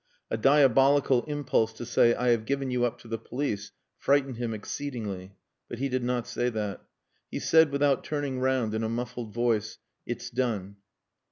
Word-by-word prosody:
A - - +1
diabolical 135 +1 +4
impulse 140 -7 0
to 120 - -7
say, 120 0 +4
"I 125 0 +1
have 115 -2 +2
given 135 -1 -1
you 125 -1 +2
up 120 - -2
to - - -14
the 115 0 -3
police," 115 -4 -3 0.3
frightened 135 -3 +2
him 120 -1 -2
exceedingly. 105 -4 -5 0.3
But 120 - -5
he 135 +3 -1
did 130 -1 -1
not 120 -1 -1
say 120 0 -1
that. 105 -4 -3 0.5
He - - -4
said, 160 -1 +5
without 140 -2 +2
turning 145 -4 -2
round, 130 -4 +1
in 110 - -1
a 110 - -1
muffled 120 -1 -4
voice 115 -2 0 0.3
"It's 120 +1 -5
done." 110 -6 -2
120 Hz, 175 wpm, -28 LUFS, 110-135 Hz, 0.5 s, said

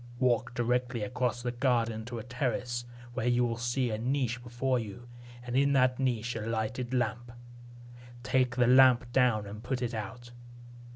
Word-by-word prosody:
Walk 125 -1 +1
directly 120 -1 0
across 125 +1 -2
the 120 - -1
garden 120 -3 0
to 120 0 -6
a 110 - -5
terrace, 120 -1 -2 0.3
where 120 -1 -2
you 120 0 +3
will 115 -1 -1
see 120 +1 -1
a 110 - -2
niche 125 -1 -1
before 125 +1 -1
you, 120 +2 -8 0.4
and 125 0 -5
in 140 +1 +3
that 130 -1 +3
niche 120 -3 -1
a 110 - -3
lighted 115 +3 -2
lamp. 120 -1 -1 0.9
Take 125 -1 +1
the 125 -1 +3
lamp 125 -1 +6
down 120 -5 +3
and 105 +2 -8
put 125 +2 -2
it 120 -1 -2
out. 115 +3 -6
120 Hz, 170 wpm, -30 LUFS, 115-125 Hz, 0.9 s, lamp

